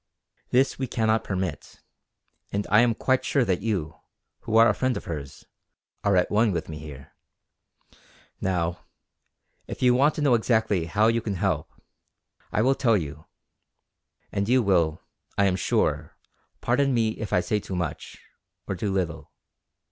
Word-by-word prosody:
This 130 +2 +2
we 130 - -1
cannot 110 -1 +1
permit; 95 -5 -4 0.7
and 100 0 -1
I 105 +2 +7
am 120 -2 +2
quite 130 +3 +1
sure 140 -6 +1
that 95 -3 0
you, 95 -8 -3 0.4
who 110 - 0
are 115 +1 +8
a 105 - +3
friend 130 +3 0
of - - -8
hers, 70 -4 -7 0.6
are 100 -1 +3
at 90 - +1
one 110 +1 +3
with 85 -3 -3
me 75 -1 -6
here. 75 -2 -11 1.3
Now, 90 -2 -1 0.9
if - - -6
you 125 -1 +5
want 140 +4 +3
to - - -3
know 140 -4 +4
exactly 110 -6 +1
how 105 +6 +1
you 115 +1 +2
can 105 -3 -3
help 90 -5 -1 0.8
I 110 - +1
will 135 +2 +4
tell 115 -5 +2
you; 80 -2 -6 1.0
and 100 +2 -1
you 125 0 +4
will, 85 -5 +1 0.3
I 100 - +4
am 95 -2 +2
sure, 95 - -1 0.4
pardon 135 +2 +2
me 115 -2 +2
if 110 -1 -6
I - - +3
say 105 +3 -1
too 95 - -6
much 90 -4 -4 0.5
or - - -2
too 100 +3 -2
little. 90 -4 -3
105 Hz, 165 wpm, -25 LUFS, 90-115 Hz, 1.3 s, are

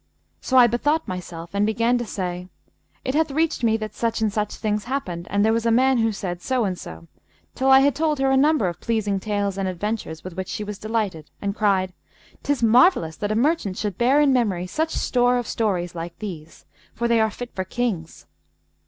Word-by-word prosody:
So 260 - +1
I 250 - +9
bethought 290 +7 +1
myself 170 -2 -6
and 200 0 +1
began 230 +3 +2
to 240 - -4
say, 180 -2 -4 0.6
'It 260 - -1
hath 315 +1 +2
reached 315 -2 0
me 225 -1 +3
that 215 -1 -6
such 230 -1 -1
and 215 -2 0
such 210 -1 -2
things 210 -1 -2
happened 185 -10 -4
and 200 +1 +2
there 220 - +3
was 230 0 0
a - - +3
man 260 +2 +4
who 225 0 +2
said 180 -4 -5
so 255 0 0
and 185 -2 -1
so,' 80 - -10 0.5
till 265 +1 0
I 265 0 +8
had 285 0 +3
told 305 +2 0
her 270 0 +2
a - - +4
number 285 -6 +3
of 175 - -4
pleasing 210 -4 0
tales 200 -1 -2
and 195 - -1
adventures 185 -3 -4
with 185 - -7
which 190 0 -4
she 215 - -3
was 210 -1 -6
delighted 210 -8 -2
and 200 0 -3
cried, 190 -4 +1 0.5
''Tis 285 -4 -1
marvellous 230 - +4
that 205 0 -2
a - - 0
merchant 235 - +1
should 205 -3 -3
bear 255 +4 +4
in 290 -2 +4
memory 200 -8 +1
such 315 - -1
store 245 -4 +2
of 245 - -2
stories 185 -8 -1
like 170 0 -6
these, 170 -7 -8 0.3
for 235 - 0
they 235 -1 +3
are 220 0 +3
fit 245 +3 -8
for 190 - -2
Kings.' 185 -5 -3
215 Hz, 215 wpm, -23 LUFS, 185-245 Hz, 0.6 s, I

